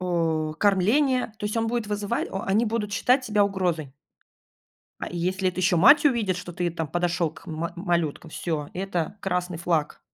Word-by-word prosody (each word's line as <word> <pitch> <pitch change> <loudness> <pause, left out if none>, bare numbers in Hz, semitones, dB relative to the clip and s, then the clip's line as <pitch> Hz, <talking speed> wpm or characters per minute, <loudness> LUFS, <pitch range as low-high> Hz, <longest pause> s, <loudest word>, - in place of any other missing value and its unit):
о, 165 -3 0
кормление. 225 +6 +2
То - - -6
есть 210 - -3
он 225 0 +1
будет 235 -2 -1
вызывать 205 +2 -2
о 190 - -4
они 210 +5 +2
будут 210 -2 -2
считать 255 +4 +2
тебя 210 -2 +3
угрозой. 175 -8 -2 1.1
А - - -3
если 185 +2 -1
это 185 0 -3
еще 180 -1 +3
мать 290 - +7
увидит, 225 -10 +2
что 180 -1 -7
ты 175 0 -1
там 165 -1 -3
подошел 175 0 0
к - - -16
ма 165 +1 -4
малюткам,- 170 -3 -1
всё, 155 -4 -3
это 185 0 -3
красный 180 -2 -2
флаг. 165 -3 -1
185 Hz, 180 wpm, -25 LUFS, 170-210 Hz, 1.1 s, мать